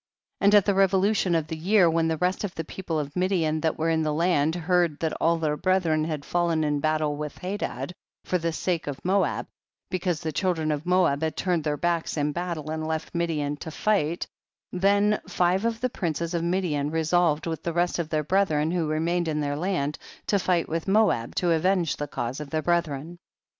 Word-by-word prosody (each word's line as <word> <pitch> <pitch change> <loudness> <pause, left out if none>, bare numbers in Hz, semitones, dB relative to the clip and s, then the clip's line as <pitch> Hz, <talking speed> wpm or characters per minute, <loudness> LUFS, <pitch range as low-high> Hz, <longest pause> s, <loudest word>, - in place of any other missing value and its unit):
14. 200 - +3
And 205 - +6
at 205 -2 +6
the 200 - +3
revolution 195 -1 +3
of 160 -2 +1
the 160 - -5
year, 185 +3 +4
when 165 0 +2
the 160 -1 0
rest 180 +5 0
of 200 -4 -4
the 165 - -3
people 165 0 -4
of 145 -2 -4
Midian 175 -4 +1
that 160 -1 0
were 165 +1 +1
in 160 0 +1
the 155 -1 0
land 160 -1 +2
heard 175 -2 +1
that 160 -1 -1
all 170 +1 +3
their 155 -2 0
brethren 165 -3 +1
had 155 -3 -4
fallen 170 -2 +1
in 150 -1 0
baltle 155 -1 0
with 150 -1 -5
Hadad 180 -6 -4 0.3
for 180 - 0
the 165 0 -1
sake 170 0 -2
of 145 +2 -6
Moab, 195 +2 +1 0.5
because 180 -3 -1
the 160 -2 -2
children 160 -1 0
of 150 +3 -3
Moab 180 -6 +3
had 160 0 -2
turned 175 -4 0
their 150 -1 -1
backs 170 -1 -1
in 150 0 +1
battle 170 -2 -4
and 155 0 -3
left 160 0 -3
Midian 155 -4 -1
to 160 - -7
fight, 170 -2 0 0.5
tlien 200 +3 +3
five 180 +4 +1
of 230 0 -1
the 255 - +1
princes 170 - -2
of 170 -1 0
Midian 170 -5 0
resolved 160 0 +1
with 160 -2 -3
the 170 - -2
rest 175 +1 0
of 165 -2 -2
their 155 -1 0
brethren 160 -3 +1
who 170 -3 0
remained 165 +3 0
in 155 -1 -1
their 145 -1 -1
land, 155 -3 -1 0.3
to 200 - +2
fight 175 -2 +1
with 165 +2 -3
Moab 195 - +2
to 175 -2 +1
avenge 175 0 +2
tlic 145 -1 -5
cause 120 +2 -3
of 150 -2 -7
their 155 +1 -1
brethren. 170 -1 -1
165 Hz, 210 wpm, -26 LUFS, 155-180 Hz, 0.5 s, And